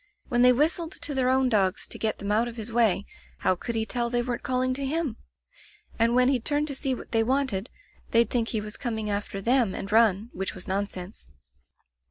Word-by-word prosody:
When 240 0 +2
they 250 0 +7
whistled 320 +6 +1
to 335 -3 -3
their 260 -2 +1
own 260 0 +3
dogs 200 -5 +1
to - - -4
get 220 -1 0
them 200 +1 -4
out 225 +3 +2
of 235 - -7
his 225 0 -5
way, 220 -4 +2 0.4
how - - +3
could 230 +6 -5
he 220 -1 0
tell 240 0 -2
they 240 0 0
weren't 240 -1 -3
calling 255 -1 0
to 275 +2 -4
him? 285 -4 -2 0.8
And 230 +1 +3
when 250 0 +5
he'd 260 -4 +1
turn 290 +2 +1
to 295 - -5
see 270 -1 -1
what - - -11
they 225 -1 +3
wanted, 255 -4 0 0.4
they'd 230 0 +4
think 235 -2 +1
he 220 -3 -1
was 210 +1 -7
coming 220 -4 -2
after 200 -1 -3
them 240 -4 +2
and 200 - -5
run, 220 0 +3
which 190 +1 -3
was 185 - -7
nonsense. 190 - -4
235 Hz, 220 wpm, -26 LUFS, 210-255 Hz, 0.8 s, they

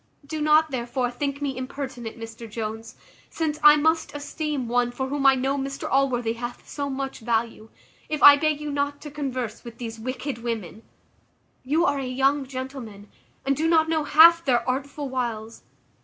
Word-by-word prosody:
Do 310 +2 -5
not, 305 +1 +4
therefore, 245 0 -2
think 280 +3 -3
me 275 -2 -2
impertinent, 255 -3 -6
Mr 225 0 -9
Jones 220 +1 -6 0.3
(since 310 -2 -2
I 300 0 +9
must 320 +1 +1
esteem 290 -2 -3
one 245 +1 +1
for 265 +2 -4
whom 280 0 +1
I 270 - +7
know 270 +2 -1
Mr 275 +1 -4
Allworthy 250 -4 +1
hath 240 +1 -7
so 285 -1 -4
much 270 0 -4
value), 225 -1 -2 0.4
if 305 -1 -2
I 285 - +11
beg 300 0 0
you 300 -1 -4
not 285 0 -2
to 295 - -8
converse 255 -6 -4
with 235 -2 -10
these 225 -2 -7
wicked 255 +2 -4
women. 225 -3 -5 0.8
You 305 +6 +1
are 285 0 +1
a 265 - -3
young 270 +2 +1
gentleman, 255 -6 -8 0.3
and 275 0 +2
do 315 +4 0
not 320 -1 +4
know 320 -2 +1
half 335 +3 +7
their 240 -5 +1
artful 280 +3 -3
wiles. 230 -4 -4
270 Hz, 175 wpm, -24 LUFS, 240-290 Hz, 0.8 s, I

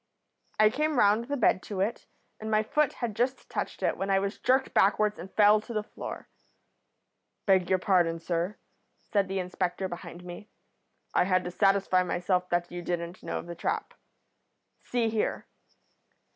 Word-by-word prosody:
"I 215 0 +6
came 300 +3 0
round 215 +1 +4
the 285 +3 -2
bed 210 -5 +3
to 200 0 -6
it, 205 +5 -1 0.3
and 220 - -5
my 215 0 +3
foot 295 +6 +1
had 230 -4 -4
just 250 +4 -1
touched - - -4
it - - +1
when 195 - -2
I 195 - +4
was 195 +1 -2
jerked 265 +1 +2
backwards 210 +1 +3
and 185 +3 -8
fell 210 0 +5
to 235 - -8
the 215 - 0
floor. - - -8 1.2
"'Beg 190 -3 +3
your 190 - +4
pardon, 175 -3 +2
sir,' 170 +4 -2 0.5
said 200 -2 0
the 195 0 -3
inspector 180 0 -2
behind 175 -1 -8
me. 180 +4 -9 0.6
'I - - +3
had 185 -1 +2
to 180 - -5
satisfy 195 -1 +3
myself 180 0 0
that 175 0 0
you 175 0 -5
didn't 175 0 -4
know - - -3
of - - -6
the 170 - -6
trap. 405 - -3 0.9
See 240 -2 0
here.' 220 -1 -1
195 Hz, 170 wpm, -28 LUFS, 180-215 Hz, 1.2 s, I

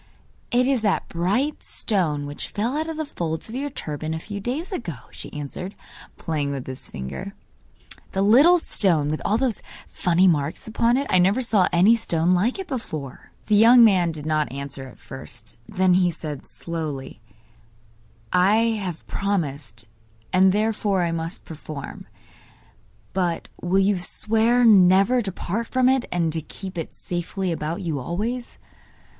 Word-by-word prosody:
'It 245 +1 +3
is 265 -3 +2
that 205 -3 +1
bright 205 - 0
stone 160 -9 -1
which 145 0 -5
fell 230 +6 -2
out 315 +2 -1
of 320 - -5
the 315 - -2
folds 160 - -4
of - - -8
your 280 +3 -2
turban 155 - -4
a - - -3
few 205 +4 -6
days 265 - -3
ago,' 170 - -6
she - - -9
answered, 150 +7 -6 0.4
playing 150 -4 -2
with 140 -2 -4
his 130 -1 -7
finger; 185 - -6 0.8
'the 195 - 0
little 280 - +7
stone 170 - +1
with 155 - -2
all 215 - +2
those 245 -4 -1 0.3
funny 180 +1 +2
marks 150 -3 0
upon 230 +2 +2
it. 280 - 0
I 185 - +5
never 195 +8 +3
saw 210 -6 +3
any 185 +6 +5
stone 175 -6 +1
like 200 +8 +1
it 385 - -5
before.' 155 - -6 0.2
The 215 - 0
young 230 +3 +8
man 185 -6 +4
did 155 -2 -7
not 155 -3 0
answer 140 -1 -6
at 125 - -14
first; 120 -2 -9
then 185 -1 +3
he 180 -1 +4
said, 150 -4 -7
slowly: 150 -8 -6 1.1
'I 185 +3 +5 0.3
have 180 -4 -5
promised, 145 - -3 0.5
and 190 +1 +6
therefore 210 -2 +1
I 170 - 0
must 165 +2 -5
perform. 155 -3 -8 1.1
But 175 -3 -1
will 180 +2 +1
you 195 0 +3
swear 225 +6 +2
never 195 +3 +6
to 200 -4 -3
part 215 +6 -3
from 255 -1 +2
it, 260 -1 +3
and 170 -3 +1
to 160 - -2
keep 190 +4 -8
it 165 -2 -4
safely 180 +1 -3
about 165 +3 -3
you 160 -5 -2
always? 220 - -4
185 Hz, 160 wpm, -23 LUFS, 155-225 Hz, 1.1 s, young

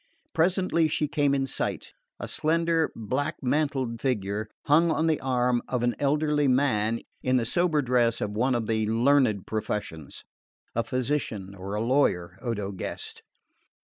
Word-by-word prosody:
Presently 170 -1 +2
she 155 0 0
came 145 -2 +1
in 135 -1 0
sight: 135 - -3 0.3
a - - -5
slender 165 0 +1
black 140 +8 -2
mantled 130 -4 0
figure 105 -4 -1 0.2
hung 160 +4 +4
on 160 0 +1
the 160 -2 +2
arm 125 -2 +1
of 125 -2 -1
an 120 0 +2
elderly 150 0 +2
man 115 -4 +2 0.2
in 130 0 +2
the 120 - 0
sober 155 +3 +1
dress 120 -2 +2
of 105 - -2
one 125 +5 +1
of 115 -2 -1
the 110 -1 0
learned 115 -3 +3
professions 105 -8 -4 0.5
a 115 - 0
physician 120 -6 -2
or 100 +1 -6
a 105 - -1
lawyer, 95 -9 +1
Odo 105 -5 -3
guessed. 95 - -6
125 Hz, 150 wpm, -27 LUFS, 110-145 Hz, 0.5 s, hung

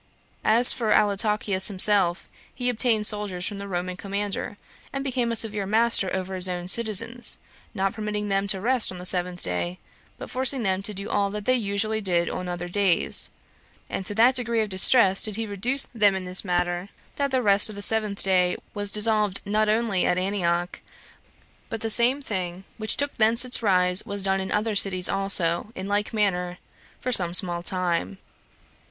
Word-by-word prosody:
As 235 +3 +6
for 225 -3 -2
Antiochus 205 -2 +2
himself, 190 -3 +2 0.3
he 250 -1 -1
obtained 225 -2 0
soldiers 205 -4 -1
from 205 -2 -5
the 200 - -7
Roman 180 -1 -3
commander, 200 +1 -4 0.3
and 275 0 -4
became 250 -3 -1
a - - -2
severe 215 -3 -1
master 220 -2 +2
over 190 0 -4
his 185 0 +1
own 180 -1 -4
citizens, 235 +3 +2 0.4
not 195 -1 -1
permitting 210 -1 -4
them 195 0 0
to 195 -1 0
rest 240 +2 +1
on 185 - -8
the 180 - -9
seventh 180 -1 -1
day, 90 0 -2 0.4
but - - -9
forcing 260 0 +2
them 190 -1 0
to 205 +1 -7
do 200 +2 -6
all 200 -1 0
that 210 0 -6
they 255 - +3
usually 215 -1 -1
did 175 -3 0
on 180 - -5
other 175 0 -5
days; 185 -2 0 0.6
and - - -3
to 205 - -4
that 235 +4 +5
degree 235 -3 0
of 215 - -2
distress 195 +1 +4
did 215 -2 +1
he 225 +1 -3
reduce 230 +7 -1
them 205 -4 +3
in 190 -1 -5
this 180 0 -1
matter, 175 0 -2 0.3
that 280 -1 0
the 260 -2 0
rest 205 0 +4
of 215 - -9
the 205 - -6
seventh 215 -2 0
day 180 -2 +2 0.2
was 205 -1 -3
dissolved 210 -2 0
not 215 +1 +1
only 215 -4 +1
at 180 - +1
Antioch, 180 -2 -1 0.9
but 225 -1 -5
the 225 - -1
same 250 +5 +2
thing 185 -5 -4 0.2
which 215 0 -1
took 285 0 -2
thence 230 +2 +3
its 250 - 0
rise 180 -3 +3
was 200 -1 -5
done 195 0 +1
in 190 - -5
other 215 +1 0
cities 190 -3 +3
also, 195 -1 -1
in 190 +1 -6
like 205 +1 -1
manner, 180 -4 -1 0.4
for 255 - -3
some 175 -6 +5
small 175 -2 +2
time. 180 +1 -2
200 Hz, 185 wpm, -24 LUFS, 185-220 Hz, 0.9 s, As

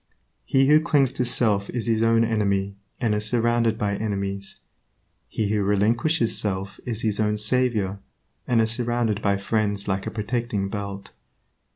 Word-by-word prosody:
He 135 0 +3
who 150 +2 +5
clings 145 -5 +2
to 130 - -1
self 105 -5 +2
is 120 -3 -3
his 115 -1 +1
own 115 0 +3
enemy 100 -3 0 0.2
and 115 -3 +1
is 105 0 0
surrounded 120 -1 +1
by 105 -3 -1
enemies. 100 -2 -3 0.7
He 110 -2 -2
who 105 0 +1
relinquishes 115 +7 +1
self 100 -1 -2
is 115 -2 -3
his 110 -2 +2
own 105 0 +1
savior, 105 -3 +1 0.5
and 120 -2 +3
is 110 0 +2
surrounded 120 -2 -1
by 100 -1 +1
friends 100 0 0
like 95 -1 -2
a - - 0
protecting 110 -2 -2
belt. 100 -1 -6
110 Hz, 160 wpm, -24 LUFS, 100-120 Hz, 0.7 s, who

